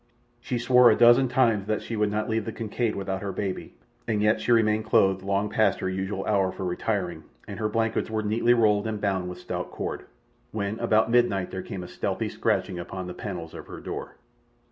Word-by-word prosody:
She 120 +1 -3
swore 125 +1 +6
a - - +5
dozen 120 +2 +6
times 115 -5 +2
that 110 -1 -1
she 115 - -4
would 105 -1 +1
not 105 +2 -2
leave 110 -2 -1
the 115 - -3
Kincaid 115 0 -2
without 95 -1 -3
her 100 -1 -3
baby, 95 0 -4 0.3
and 110 -3 0
yet 105 +1 +2
she - - 0
remained 110 -2 +3
clothed 95 -4 +3
long 100 +1 0
past 110 +1 +2
her 95 - -2
usual 95 +1 -3
hour 95 -3 +2
for 95 - -6
retiring, 90 -1 -2 0.2
and - - -7
her 110 -1 0
blankets 110 +1 0
were 110 -1 -1
neatly 115 +3 +3
rolled 105 -2 +3
and 110 -1 -3
bound 95 -3 -1
with 90 - -7
stout - - -5
cord, - - -5 0.5
when 105 0 -3
about 110 -1 +2
midnight 115 -6 +2
there 95 - -4
came 95 -1 -6
a - - -8
stealthy - - -3
scratching 90 - -1
upon 90 +1 -6
the 90 - -6
panels 90 -6 -6
of - - -9
her - - -8
door. - - -6
105 Hz, 210 wpm, -26 LUFS, 95-115 Hz, 0.5 s, swore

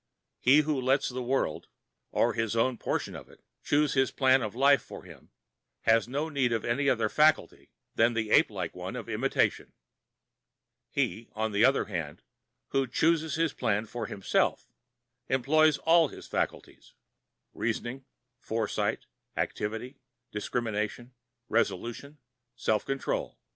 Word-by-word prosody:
He 140 +5 +6
who 150 -3 -1
lets 135 +2 +2
the 130 0 -4
world, 130 +2 -1 0.4
or - - +2
his 115 0 -1
own 120 +1 +1
portion - - -2
of - - -10
it, - - -20 0.2
choose 145 0 +2
his 135 -1 +2
plan 130 -1 +3
of 110 -1 -4
life 140 +2 +5
for - - -11
him - - -15 0.5
has 115 0 +3
no 145 +5 -2
need 140 -6 0
of 115 -2 -1
any 140 +4 +1
other 115 -4 +2
faculty 155 +6 +2 0.2
than 115 +1 +3
the 110 -2 -2
ape - - +5
like - - -4
one - - -6
of - - -6
imitation. - - 0 1.2
He, 110 +6 -2
on 110 0 -2
the 100 +2 +2
other 135 +2 +4
hand, 85 -7 -5 0.5
who 135 -1 +1
chooses 160 +4 +1
his 160 -2 0
plan 110 -3 0
for 115 0 -5
himself, 100 - 0 0.6
employs 150 +4 +3
all 165 0 +4
his - - -11
faculties—reasoning, 120 +4 -5 0.4
foresight, 110 -1 -2 0.3
activity, 115 +6 -3 0.3
discrimination, 110 +2 -3 0.3
resolution, 120 +5 -2 0.4
self 105 -2 0
control. 135 0 -3
125 Hz, 135 wpm, -29 LUFS, 110-140 Hz, 1.2 s, He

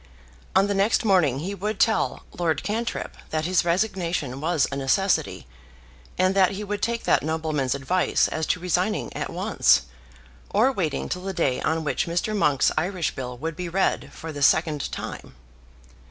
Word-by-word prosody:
On 190 +1 +5
the 205 - 0
next 200 +4 +2
morning 160 - +3
he 190 +5 -3
would 200 +2 -3
tell 220 - +1
Lord 160 -4 0
Cantrip 230 +3 -3
that 155 0 -1
his 185 +1 +2
resignation 170 - -1
was 160 -2 +2
a - - -3
necessity, 140 +8 0 0.7
and 185 +1 +3
that 190 -1 +4
he 205 +2 -5
would 205 0 -4
take 235 0 -1
that - - +3
nobleman's 155 -4 -1
advice 175 +7 +1
as 160 0 -3
to 180 - +1
resigning 180 +4 -1
at - - -3
once, - - +3 0.7
or 235 +6 +3
waiting 170 - -2
till 180 - -3
the 190 +1 -4
day 135 -8 0
on 160 +1 0
which 150 - -1
Mr. 175 +6 -1
Monk's 150 -9 +3
Irish 175 -1 -1
Bill 125 -1 -6
would 160 +4 -4
be 180 +1 -4
read 190 +3 0
for 160 -1 -8
the 145 -2 -7
second 155 +1 +2
time. - - -7
175 Hz, 170 wpm, -24 LUFS, 155-195 Hz, 0.7 s, On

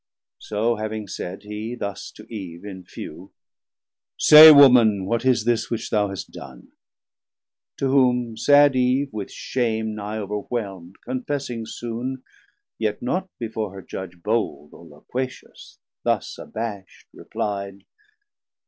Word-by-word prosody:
So 110 +2 -1
having 110 -1 -4
said, 95 +2 -6
he 105 +3 -6
thus 100 -4 -5
to 105 - -13
Eve 95 -5 -8
in 95 -3 -8
few: - - -10 0.9
Say 155 +1 +10
Woman, 120 -9 +6
what 115 +4 -1
is 125 -4 +2
this 120 -1 +1
which 115 - -4
thou 105 -2 +2
hast 95 -3 -7
done? 65 -3 -12 1.1
To 135 - 0
whom 125 -4 +2
sad 145 +3 +5
Eve 130 +2 +1
with 105 -2 -5
shame 110 -3 -2
nigh 105 +1 -5
overwhelm'd, 100 -3 -5
Confessing 140 - -4
soon, 120 +3 -5 0.6
yet 110 -2 -2
not 185 +9 -2
before 110 -4 -4
her 95 - -9
Judge 95 -2 -7
160 85 - -26
Bold 105 -9 -2
or 85 - -14
loquacious, 125 - -7 0.2
thus - - -1
abasht 105 -4 -7
repli'd. 100 -1 -5
110 Hz, 130 wpm, -23 LUFS, 100-125 Hz, 1.1 s, Say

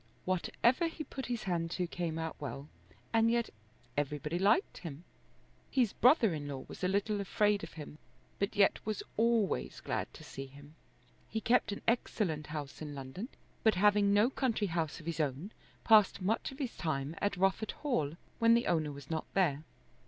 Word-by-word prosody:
Whatever 235 - +2
he 325 -1 -5
put 265 -4 -6
his 240 -2 -2
hand 170 -3 -1
to 180 +1 -1
came 170 -2 -3
out 160 0 -3
well; 140 0 -5 0.5
and 225 0 +4
yet 235 0 +1 0.4
everybody 150 +3 -1
liked 205 - +2
him 165 -2 -7 0.7
His 245 -6 +2
brother 245 - +5
in 145 -2 -4
law 135 -2 -5
was - - -10
a - - +3
little 200 +2 0
afraid 205 +1 +2
of - - -7
him, 150 -1 -9 0.4
but 200 - -1
yet 200 -1 +3
was 215 -1 -3
always 225 -2 +1
glad - - -3
to - - -11
see 135 0 -7
him. 145 +2 -14 0.6
He 220 - -1
kept 230 -1 +2
an 200 - -6
excellent 190 -9 0
house 150 -2 -6
in 150 -2 -5
London, 135 - -6 0.3
but 220 -3 +4
having 205 +1 +4
no 210 +5 +4
country 245 -6 0
house 165 -2 -2
of 155 - -12
his 165 -1 -3
own 150 +6 -1 0.3
passed 215 -3 +6
much 210 +8 0
of 270 - -11
his 265 -5 -3
time 145 -3 -2
at 205 -2 0
Rufford 195 +4 +1
Hall 165 - 0 0.2
when 230 0 +6
the 235 - +2
owner 155 -3 +1
was 140 +1 -10
not 160 -1 -3
there. 155 -7 +2
190 Hz, 180 wpm, -33 LUFS, 155-225 Hz, 0.7 s, passed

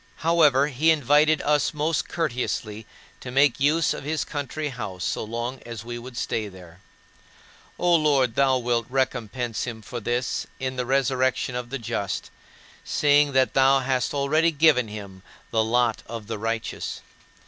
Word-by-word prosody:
However, 150 -5 +5
he 150 +4 +2
invited 150 +1 +4
us 150 +1 +1
most 155 +2 -1
courteously 120 -8 -3 0.3
to 125 - -8
make 135 0 +3
use 150 +3 +2
of - - -7
his 155 +2 -2
country 145 +1 -4
house 100 -8 -6
so - - -1
long 120 +4 -4
as 115 -2 -8
we 120 0 -5
would 120 0 -10
stay 110 -1 -2
there. 90 -3 -13 1.0
O 175 0 +2
Lord, 140 -6 +2
thou 135 +1 +3
wilt 120 -2 -1
recompense 125 -3 -2
him 115 -3 -7
for 120 +4 -6
this 120 +3 -2
"in 130 -1 -3
the 125 -1 -3
resurrection 130 -1 +1
of 125 -1 -4
the 135 - -3
just," 100 -4 -4 0.5
seeing 145 -1 +3
that 130 0 +3
thou 135 0 +4
hast 130 -1 0
already 155 +4 +2
given 150 -6 +3
him 100 -3 -9 0.3
"the 110 -1 +2
lot 120 0 +1
of 115 -2 -7
the 110 0 -5
righteous." 115 +1 -3
130 Hz, 160 wpm, -24 LUFS, 115-145 Hz, 1.0 s, However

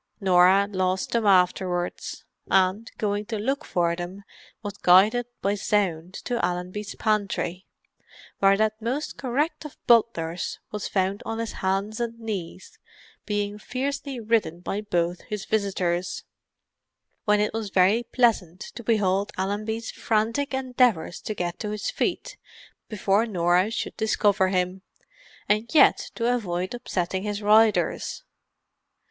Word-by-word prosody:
Norah 190 0 +5
lost 185 -1 -1
them 230 -3 +1
afterwards, 180 -1 +1 0.2
and 190 +4 +2
going 205 -1 -1
to 225 - -3
look 270 +8 -1
for 170 - 0
them, 180 +3 -7 0.4
was 205 -1 -4
guided 210 +7 +5 0.2
by 200 - +2
sound 190 -4 -1
to 240 -1 -1
Allenby's 180 +3 -3
pantry, 200 -4 -1 0.7
where 195 0 +5
that 215 +1 0
most 255 +7 -2
correct 280 +6 -1
of 300 - -10
butlers 180 -8 +2
was 210 -1 -4
found 190 +1 0
on 225 - -4
his 230 -1 -3
hands 195 +3 -2
and 230 -1 -3
knees, 195 -5 -6 0.5
being 205 0 -2
fiercely 270 +2 -3
ridden 215 -7 0
by 200 +3 -3
both 175 -4 -1
his 210 -2 -4
visitors, 185 -4 -1 1.0
when 210 0 +3
it 210 +1 0
was 220 -2 -3
very 190 +5 +4
pleasant 225 -8 +1
to 235 - -8
behold 205 -3 +1
Allenby's 215 +4 -2
frantic 230 +6 0
endeavours 250 -10 +1
to 215 - -4
get 175 -2 -3
to 210 - -3
his 210 - -3
feet - - -2 0.5
before 210 +1 +1
Norah 180 0 +2
should 225 - -4
discover 205 -3 +2
him, 185 0 -1 0.7
and 215 +3 +1
yet - - +5
to 235 +1 +1
avoid 185 -5 -2
upsetting 190 -6 -2
his 205 0 -4
riders. 215 +1 +3
205 Hz, 130 wpm, -25 LUFS, 185-225 Hz, 1.0 s, Norah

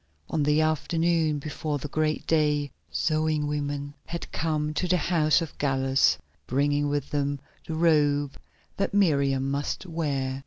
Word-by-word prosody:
On 160 - +1
the 150 +2 +3
afternoon 160 0 +1
before 150 +1 -3
the 145 - -5
great 155 +1 -1
day 150 -3 +1 0.2
sewing 155 - 0
women 145 -1 -3
had 170 0 -6
come 155 -2 -1
to 180 +4 -1
the 180 +1 +3
house 155 -3 +2
of 160 - -8
Gallus, 135 -1 +3 0.3
bringing 145 +2 +1
with 145 -1 -2
them 145 -1 0 0.3
the 160 - -3
robe 145 -4 +2 0.4
that 195 0 -1
Miriam 140 -8 +2
must 140 +6 -2
wear. 140 -6 -2
150 Hz, 145 wpm, -27 LUFS, 145-155 Hz, 0.4 s, the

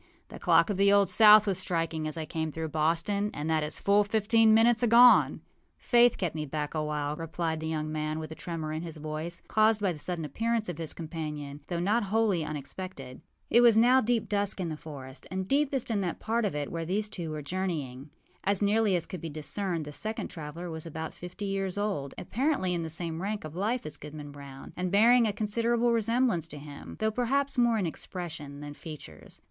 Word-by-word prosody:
âThe - - -10
clock - - +4
of 195 - -2
the 200 +1 +5
Old 200 -2 +4
South 210 +2 +8
was 195 -3 +1
striking 165 -4 -1
as 155 - -1
I 160 - -3
came 160 0 -3
through 160 +1 -4
Boston, 165 +7 +1
and 150 +1 -4
that 160 -1 +2
is 150 - -2
full 205 +1 +3
fifteen 220 +2 +3
minutes 230 +2 +5
agone.â 240 +1 +6 0.4
âFaith 240 -1 +4
kept 180 -4 -2
me 155 -1 -3
back 150 +1 -3
a 155 -1 -1
while,â 150 0 -2
replied 165 0 -2
the 160 - -4
young 155 -1 -2
man, 155 0 -2
with 160 0 -6
a - - -4
tremor 160 -2 -5
in 155 - -3
his 165 -2 -7
voice, 155 +3 -5
caused 215 0 +3
by 195 -3 0
the 155 - -10
sudden 170 0 -4
appearance 225 - -1
of 170 -2 -5
his 160 -2 -5
companion, 150 -3 -6
though 175 -2 -2
not 205 +5 +1
wholly 205 -4 +1
unexpected. 145 -2 -7 0.3
It 235 - +6
was 235 -2 +6
now 250 +3 +6
deep 230 -1 0
dusk 200 -1 -1
in 175 -3 -2
the 155 - -4
forest, 140 -3 -10
and 190 0 -3
deepest 275 -2 +1
in 205 -3 +1
that 180 -3 -3
part 230 +1 0
of 195 - -2
it 145 -1 -3
where 165 0 -3
these 200 +6 -1
two 175 -5 -6
were 155 -1 -5
journeying. 150 -6 -4 0.3
As 200 0 +1
nearly 210 -1 +2
as 170 - 0
could 185 -4 -7
be 165 - -5
discerned, 160 +3 -3
the 145 - -7
second 215 +8 -3
traveller 165 +2 -7
was 160 0 -6
about 160 0 -5
fifty 180 +4 -7
years 195 -1 -2
old, 195 -10 -2
apparently 255 -8 0
in 170 - -1
the 165 - -4
same 165 0 -4
rank 205 +2 -3
of 155 0 -8
life 220 +7 -1
as 150 -1 -6
Goodman 150 0 -9
Brown, 140 -1 -11
and 180 0 -2
bearing 230 +4 +5
a - - +1
considerable 230 +3 +1
resemblance 230 -6 +1
to 150 - -10
him, 145 -1 -10
though 220 0 +1
perhaps 270 +5 0
more 240 -2 +3
in 200 - 0
expression 160 -4 -6
than 145 0 -7
features. 155 0 -11
175 Hz, 215 wpm, -29 LUFS, 155-215 Hz, 0.4 s, South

